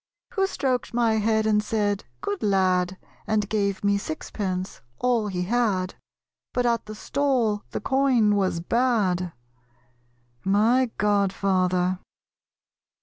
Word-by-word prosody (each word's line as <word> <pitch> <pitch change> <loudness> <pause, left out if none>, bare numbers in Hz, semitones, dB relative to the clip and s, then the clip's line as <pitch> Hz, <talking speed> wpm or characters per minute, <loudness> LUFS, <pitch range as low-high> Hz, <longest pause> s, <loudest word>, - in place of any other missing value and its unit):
Who 390 -3 +2
stroked 255 -9 -2
my 230 -2 +2
head, 220 0 +2
and 210 -1 +3
said 205 -2 -1 0.2
"Good 205 - -3
lad," 185 -3 +2 0.3
And 210 -1 +1
gave 200 -2 -1
me 200 0 +2
sixpence, 185 +2 -4 0.2
"all 240 -4 +1
he 180 -3 -2
had"; 200 -3 0 0.6
But 245 - +1
at 235 -2 +1
the 215 - -7
stall 240 -4 0
the - - -4
coin 255 -5 +3
was 185 -4 0
bad? 195 -5 +1 1.1
My 225 +6 +3
Godfather. 185 -3 +1
210 Hz, 115 wpm, -25 LUFS, 190-235 Hz, 1.1 s, and